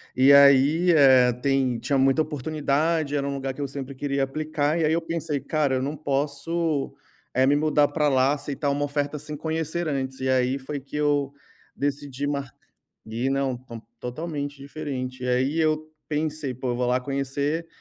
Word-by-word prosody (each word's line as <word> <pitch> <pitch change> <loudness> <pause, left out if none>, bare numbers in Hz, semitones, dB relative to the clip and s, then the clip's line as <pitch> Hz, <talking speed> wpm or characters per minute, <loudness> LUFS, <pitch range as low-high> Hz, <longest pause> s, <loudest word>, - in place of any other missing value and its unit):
E 135 +2 +6
aí, 140 +5 +6
eh, 130 -5 +6
tem 130 -1 0
tinha 135 +4 0
muita 135 +3 +3
oportunidade. 150 +1 0
Era 140 -1 -1
um 140 - -2
lugar 135 -1 -3
que 145 - -8
eu 140 - -1
sempre 140 0 -6
queria 140 0 -1
aplicar. 155 +2 -1
E - - +1
aí, 155 - +2
eu 170 - +1
pensei: 165 -3 -3
"Cara, 145 -3 0
eu 130 - 0
não 145 +3 -3
posso, 145 +2 -1 0.4
eh, 130 +1 +4
me 140 - +4
mudar 150 -1 +3
pra 150 0 +1
lá, 130 +1 +3
aceitar 145 0 -2
uma 145 +1 -1
oferta 145 +1 -2
sem 150 0 -7
conhecer 160 +2 -2
antes". 130 -2 -3
E 130 - -2
aí, 130 +1 +2
foi 140 +2 -5
que 135 +2 -11
eu 145 -2 +1 0.4
decidi 140 -1 -3
mar 140 -2 -2 0.6
e 115 +4 -2
não 135 -2 0
ton 120 -2 -10 0.2
totalmente 145 +2 -5
diferente. 135 -3 -5
E - - -2
aí, 130 +5 +1
eu 155 -1 0 0.2
pensei: 150 -2 -2
"Pô, 130 +1 -4
eu 120 - -3
vou 125 - 0
lá 125 +1 +2
conhecer". 140 +4 -2
140 Hz, 185 wpm, -25 LUFS, 135-150 Hz, 0.6 s, E